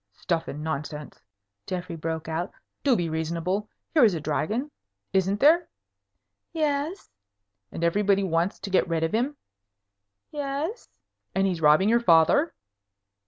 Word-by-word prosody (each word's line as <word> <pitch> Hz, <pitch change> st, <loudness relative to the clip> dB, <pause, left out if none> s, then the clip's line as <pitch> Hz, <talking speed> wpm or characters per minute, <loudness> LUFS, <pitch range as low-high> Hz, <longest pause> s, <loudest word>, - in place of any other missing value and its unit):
"Stuff 170 Hz, -2 st, -2 dB
and 150 Hz, +2 st, -6 dB
nonsense!" 150 Hz, -1 st, -5 dB, 0.5 s
Geoffrey 180 Hz, -1 st, -4 dB
broke 160 Hz, 0 st, -4 dB
out. 165 Hz, +4 st, -2 dB, 0.3 s
"Do 270 Hz, -4 st, +4 dB
be 175 Hz, -5 st, 0 dB
reasonable. 170 Hz, +6 st, -2 dB, 0.2 s
Here 305 Hz, -5 st, +5 dB
is 210 Hz, -6 st, +5 dB
a -, -, -2 dB
dragon. 210 Hz, -, -2 dB, 0.4 s
Isn't 195 Hz, +2 st, +2 dB
there?" 325 Hz, +5 st, +5 dB, 0.9 s
"Yes." 305 Hz, +3 st, -1 dB, 0.6 s
"And 170 Hz, -, -5 dB
everybody 200 Hz, +3 st, +3 dB
wants 170 Hz, +1 st, 0 dB
to 195 Hz, 0 st, -6 dB
get 185 Hz, -, +3 dB
rid 165 Hz, -1 st, 0 dB
of 165 Hz, -, -1 dB
him?" 260 Hz, +6 st, 0 dB, 0.9 s
"Yes." 295 Hz, -, -4 dB, 0.5 s
"And 195 Hz, 0 st, +3 dB
he's 180 Hz, -4 st, -1 dB
robbing 155 Hz, +6 st, +5 dB
your 235 Hz, +2 st, +4 dB
father?" 180 Hz, -, +4 dB
190 Hz, 135 wpm, -26 LUFS, 165-255 Hz, 0.9 s, Here